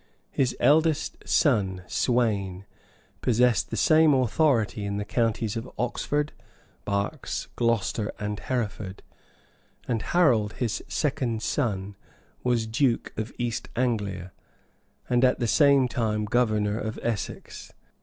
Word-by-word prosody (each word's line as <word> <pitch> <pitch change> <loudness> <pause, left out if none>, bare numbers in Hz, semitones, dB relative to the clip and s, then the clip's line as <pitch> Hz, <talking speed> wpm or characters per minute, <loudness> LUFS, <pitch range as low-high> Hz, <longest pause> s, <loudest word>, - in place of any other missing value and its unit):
His 130 -2 0
eldest 155 +1 +3
son, 100 - +2
Sweyn, 100 -6 0 0.6
possessed 125 -1 +2
the 115 - -4
same 155 +5 +5
authority 125 -4 +2
in 100 0 -2
the 105 - -3
counties 115 -1 0
of 115 +2 -5
Oxford, 145 +5 -1 0.5
Berks, 100 +8 -2
Glocester, 115 -3 0
and 105 -1 -4
Hereford; 105 -6 -4 0.8
and 115 -3 0
Harold, 120 - +2
his 120 -4 -2
second 125 -6 -1
son, 100 -8 -1 0.5
was 120 -2 +1
duke 115 +2 0
of 110 +3 -4
East 120 -2 -3
Anglia, 100 -7 -1 0.8
and 125 0 +2
at 125 - +4
the 120 - -1
same 140 +2 +5
time 110 -4 -1
governor 110 -2 +1
of 110 +1 -4
Essex. 115 -5 -4
115 Hz, 115 wpm, -26 LUFS, 105-125 Hz, 0.8 s, same